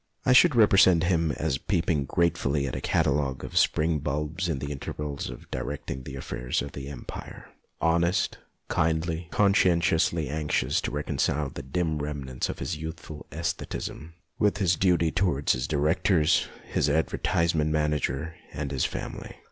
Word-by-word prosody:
I 125 - +5
should 145 +2 +6
represent 95 -6 +6
him 85 -3 +2
as 75 -3 -1
peep 90 -4 -1
ing 75 -6 +1
gratefully 70 -3 +1
at 65 - -3
a - - -4
catalogue 70 -2 0
of - - -7
spring 80 0 +3
bulbs 75 +5 -2
in 80 - 0
the 70 +2 -4
intervals 70 +1 -5
of - - -11
directing 65 0 -4
the 65 +1 -8
affairs 65 -1 -3
of 70 - -7
the 70 0 -7
Empire. 70 -4 -9 0.3
Honest, 85 +2 +1 0.3
kindly, 80 0 0
conscientiously 85 -5 +3
anxious 75 -2 0
to - - -2
reconcile 75 -1 -1
the - - -6
dim 80 +3 -1
remnants 70 -3 -3
of - - -4
his - - -3
youthful 80 -1 -8
sestheticism 80 0 -4 0.3
with 105 -2 +2
his 95 -4 +2
duty 85 -3 +2
to 90 +6 +1
wards 75 -5 +2
his 60 +1 -2
directors, 80 +2 +2 0.2
his 75 - 0
advertisement 80 +1 +1
manager, 75 0 0 0.2
and 70 -2 -4
his 65 -3 0
family. - - -6
75 Hz, 155 wpm, -27 LUFS, 70-85 Hz, 0.3 s, should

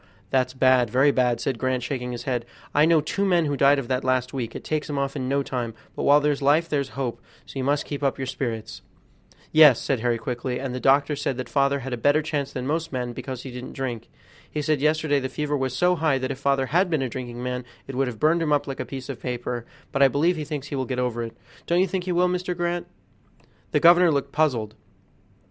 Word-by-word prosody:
"That's 130 -1 +1
bad, 130 -2 +4
very 130 +5 +4
bad," 125 -3 +1
said 130 -4 -2
Grant, 130 -1 0
shaking 125 -1 -3
his 120 - -5
head; 125 -3 -1 0.3
"I 150 +1 +5
know 165 -1 +4
two 195 +6 -2
men 175 -4 +3
who 145 -1 0
died 140 +1 +5
of 135 -3 -3
that 130 0 0
last 130 -1 0
week; 120 -4 -4
it - - -6
takes 155 0 -2
'em 145 - -2
off 140 0 -1
in 130 -2 -3
no 140 +1 +1
time; 120 -4 -4 0.2
but - - -4
while 145 +1 +6
there's 145 -1 0
life 150 +4 +3
there's 140 -4 -1
hope, 130 -4 -3 0.2
so 135 - -7
you - - -1
must 145 +2 +1
keep 145 -1 -5
up 140 -2 0
your 135 - -3
spirits." 120 -4 -4 0.7
"Yes," 150 -6 +7
said 135 -4 -1
Harry 120 0 +1
quickly, 125 +2 -3
"and 130 -1 -4
the 125 - -3
doctor 140 +3 +3
said 135 -2 -2
that 130 -2 -4
father 140 0 +2
had 130 0 -5
a - - -2
better 145 +6 +3
chance 145 -3 -2
than 125 -1 -4
most 160 +4 -1
men, 125 -2 -3
because 130 0 -6
he 130 - -7
didn't 125 +1 -8
drink. 125 -4 -4 0.4
He 150 - -3
said 150 -2 +1
yesterday 155 -1 +2
the 130 -1 -3
fever 150 0 -2
was 130 -2 -2
so 180 +5 +3
high 155 -5 +1
that 130 +1 -2
if 135 - -6
father 140 -1 +1
had 180 +2 +3
been 155 -5 +1
a - - -1
drinking 120 0 -6
man 125 0 -3 0.2
it 135 - -7
would 135 +1 0
have 115 -4 -6
burned 165 +2 +3
him 155 -2 0
up 145 -1 +2
like 135 -1 -6
a - - -2
piece 130 -2 -7
of 135 -3 -7
paper; 120 -1 -4 0.2
but 135 - -1
I 135 - +8
believe 155 +7 +2
he 155 -2 -4
thinks 145 -2 -5
he - - -3
will 130 -1 -1
get 130 0 -3
over 125 -2 -1
it; 115 0 -6 0.3
don't 170 +1 +2
you 185 - +4
think 185 0 -3
he 185 - -1
will, 180 +1 +3
Mr. 180 0 -2
Grant?" 175 0 -2 0.8
The - - +2
governor 175 0 +6
looked 140 -2 -1
puzzled. 125 -9 0
135 Hz, 255 wpm, -24 LUFS, 125-150 Hz, 0.8 s, I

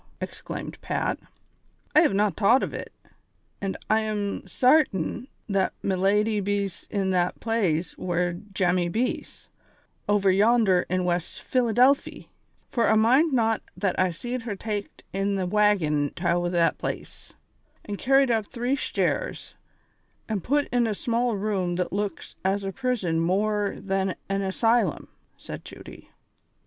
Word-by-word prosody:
exclaimed - - -7
Pat. - - -1 0.8
"I - - +9
have 300 -12 +3
not 205 -3 +2
tought 230 +6 +4
ov - - -3
it, - - -6 0.7
an' 195 -1 -2
I 220 - +3
am 210 -2 -2
sartin 255 - +2 0.2
that 195 -2 +1
me 195 - +1
lady 210 +3 +2
bees 200 -2 -2
in 195 -2 0
that 180 -1 0
plaze 190 -8 0
where 175 -1 0
Jemmy 180 -2 0
bees, 230 +7 -3 0.6
ovur 200 -2 +4
yander 205 -2 +3
in 185 0 0
"West 175 -1 -2
Philadelphy, 255 +2 +2 0.4
fur 235 -2 +2
I 220 - +4
mind 255 +9 +4
now 225 -3 +2 0.2
that 195 -3 -1
I 185 0 +3
seed 240 +9 -4
her 225 -3 -4
taked 205 0 -5
in 195 +1 0
the 190 -1 -1
waggon 180 -8 +2
tow 175 0 0
that 170 -1 +2
plaze, - - -6 0.5
an' 205 -1 -4
carried 270 +1 +3
up 220 -3 -1
tree 245 +2 0
shtares, - - -2 0.7
an' 215 -4 -2
put 285 - +1
in 245 -1 +2
a 215 - -1
small 235 0 0
room 195 -4 -1
what 180 0 -2 0.2
Inks - - -14
as 195 +1 0
a 195 - -3
prison 195 -9 -1
morer 205 +4 0
than 195 -1 -1
an 195 0 0
asj'lum," 205 - +1 0.3
said - - -8
Judy. - - -12
205 Hz, 145 wpm, -26 LUFS, 185-230 Hz, 0.8 s, I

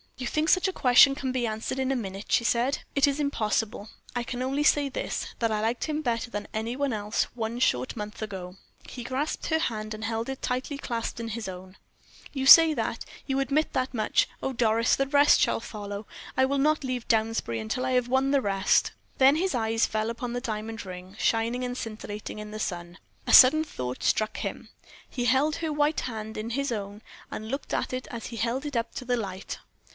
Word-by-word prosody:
"You 260 - -5
think 310 +5 0
such 370 +1 +4
a 380 - -2
question 250 0 +6
can 265 -2 -3
be 250 -2 0
answered 220 +4 -3
in 265 0 0
a - - +1
minute," 195 -4 -5
she - - +4
said. 240 +4 +1 0.2
"It 280 0 +5
is 280 +1 0
impossible. 220 -6 -1 0.3
I 245 - 0
can 245 +1 -5
only 270 +3 0
say 290 -2 +3
this, 270 - -3
that 230 -1 +1
I 210 -1 0
liked 230 +2 -1
him 310 0 -2
better 240 -3 -1
than 205 -3 -5
any 225 +3 -2
one 280 -2 -1
else 210 0 0
one 230 0 -3
short 125 - +1
month 210 0 -6
ago." 190 -4 -6 0.3
He 245 - -7
grasped 265 +5 -2
her 320 0 +2
hand 215 -6 -2
and 215 0 -7
held 225 +2 -2
it 270 - -5
tightly 255 +3 -2
clasped 235 -4 -4
in 230 -1 -4
his 225 -1 -4
own. 185 0 -9 0.6
"You 270 -2 -2
say 325 +3 +10
that - - -2 0.2
you 270 -1 0
admit 275 +3 0
that 255 0 -1
much! 215 -2 +2
Oh, 270 - -2
Doris, 230 -1 +3
the 275 - 0
rest 285 +1 +5
shall - - +2
follow. 205 -2 -7 0.3
I 260 - +5
will 275 +1 0
not 305 +1 +2
leave 255 -2 -3
Downsbury 220 - 0
until 110 - -2
I 260 - 0
have 250 -1 +2
won 265 +2 +2
the 280 -1 +3
rest." 195 -3 +2 0.3
Then 270 +2 +6
his 370 +3 0
eyes 225 -1 +1
fell 215 +1 -1
upon 235 +1 -4
the 245 - -2
diamond 225 -2 -4
ring, 185 +1 -9
shining 230 +2 +1
and 250 0 -3
scintillating 215 -2 -6
in 210 0 -7
the 215 - -6
sun. 175 -3 -4 0.3
A - - +2
sudden 295 +5 +9
thought 125 - -5
struck 215 0 +1
him: - - -5 0.4
he 245 -2 -3
held 275 +6 +2
her 320 -2 -2
white 295 +1 +1
hand 220 -2 -5
in 220 +2 -4
his 275 +2 -1
own, 205 -1 -5 0.3
and 215 +1 -6
looked 275 +3 -4
at - - -1
it 255 0 -4
as 235 -2 -6
he 235 - -7
held 240 +5 -1
it 290 -3 -5
up 230 - -2
to 255 - -5
the 245 0 +1
light. 195 -4 -5
235 Hz, 220 wpm, -27 LUFS, 215-270 Hz, 0.6 s, say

